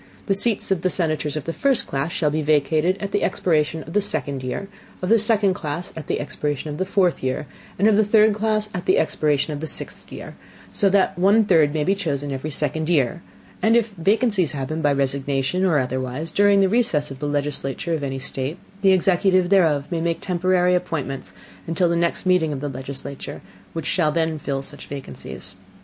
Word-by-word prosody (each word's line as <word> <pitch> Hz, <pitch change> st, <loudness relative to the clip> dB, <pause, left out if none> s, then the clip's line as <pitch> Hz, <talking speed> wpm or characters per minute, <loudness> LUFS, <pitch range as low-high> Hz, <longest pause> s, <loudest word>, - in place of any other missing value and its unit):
The 195 Hz, -, +2 dB
Seats 200 Hz, 0 st, +1 dB
of 185 Hz, -4 st, +1 dB
the 185 Hz, -, +1 dB
Senators 155 Hz, -4 st, 0 dB
of 155 Hz, -, -3 dB
the 165 Hz, -, -4 dB
first 275 Hz, +3 st, +2 dB
Class 140 Hz, +4 st, -2 dB
shall 150 Hz, -3 st, 0 dB
be 155 Hz, +1 st, -1 dB
vacated 155 Hz, +4 st, +2 dB
at 200 Hz, -1 st, -4 dB
the 205 Hz, -, 0 dB
expiration 160 Hz, -2 st, 0 dB
of 160 Hz, -, -10 dB
the 210 Hz, -, +3 dB
second 140 Hz, -7 st, -1 dB
Year, 130 Hz, +10 st, -4 dB, 0.3 s
of 180 Hz, -, -3 dB
the 225 Hz, +1 st, +5 dB
second 210 Hz, -2 st, +3 dB
Class 155 Hz, 0 st, -5 dB
at 160 Hz, -, -8 dB
the -, -, -1 dB
expiration 145 Hz, 0 st, -3 dB
of 145 Hz, -, -6 dB
the 185 Hz, -, -1 dB
fourth 185 Hz, -3 st, +1 dB
Year, 130 Hz, +2 st, -2 dB, 0.3 s
and 200 Hz, -, +3 dB
of 220 Hz, -, +5 dB
the 215 Hz, -, +4 dB
third 215 Hz, +1 st, +4 dB
Class 215 Hz, 0 st, 0 dB
at 180 Hz, 0 st, -5 dB
the -, -, +4 dB
expiration 150 Hz, -1 st, +1 dB
of 145 Hz, -, -5 dB
the 160 Hz, -, -4 dB
sixth -, -, -3 dB
Year, -, -, -8 dB, 0.4 s
so 200 Hz, -, +3 dB
that 190 Hz, -2 st, +2 dB
one 205 Hz, +4 st, +4 dB
third 160 Hz, -7 st, +4 dB
may 150 Hz, 0 st, -1 dB
be 190 Hz, -, +2 dB
chosen 145 Hz, -7 st, -3 dB
every 135 Hz, +3 st, -4 dB
second 155 Hz, +2 st, -1 dB
Year; 140 Hz, -8 st, +1 dB, 0.4 s
and 225 Hz, +1 st, +4 dB
if 230 Hz, -1 st, +1 dB
vacancies 200 Hz, -, +1 dB
happen 145 Hz, +3 st, -3 dB
by 145 Hz, -, +3 dB
Resignation, 140 Hz, +4 st, 0 dB
or 175 Hz, -5 st, +3 dB
otherwise, 130 Hz, +3 st, -2 dB
during 200 Hz, 0 st, +4 dB
the 195 Hz, -, +4 dB
recess 190 Hz, -, +1 dB
of 135 Hz, -, -8 dB
the 145 Hz, -, -3 dB
Legislature 145 Hz, +2 st, -2 dB
of 160 Hz, -, -1 dB
any 135 Hz, -1 st, -3 dB
State, 135 Hz, +4 st, -4 dB, 0.2 s
the 195 Hz, -1 st, +5 dB
Executive 185 Hz, 0 st, +2 dB
thereof 160 Hz, -7 st, +3 dB
may 165 Hz, -2 st, -1 dB
make 170 Hz, 0 st, -1 dB
temporary 180 Hz, 0 st, +1 dB
Appointments 145 Hz, -, -3 dB, 0.4 s
until 170 Hz, +2 st, +1 dB
the 170 Hz, -, +1 dB
next 170 Hz, +3 st, -1 dB
meeting 180 Hz, -4 st, +3 dB
of 140 Hz, -, -3 dB
the 145 Hz, +1 st, -3 dB
Legislature, 135 Hz, +1 st, -5 dB, 0.3 s
which 165 Hz, -2 st, -4 dB
shall 155 Hz, -3 st, +1 dB
then 160 Hz, -1 st, -1 dB
fill 135 Hz, -1 st, -3 dB
such -, -, -10 dB
Vacancies. 135 Hz, -, -8 dB
160 Hz, 205 wpm, -22 LUFS, 145-190 Hz, 0.4 s, the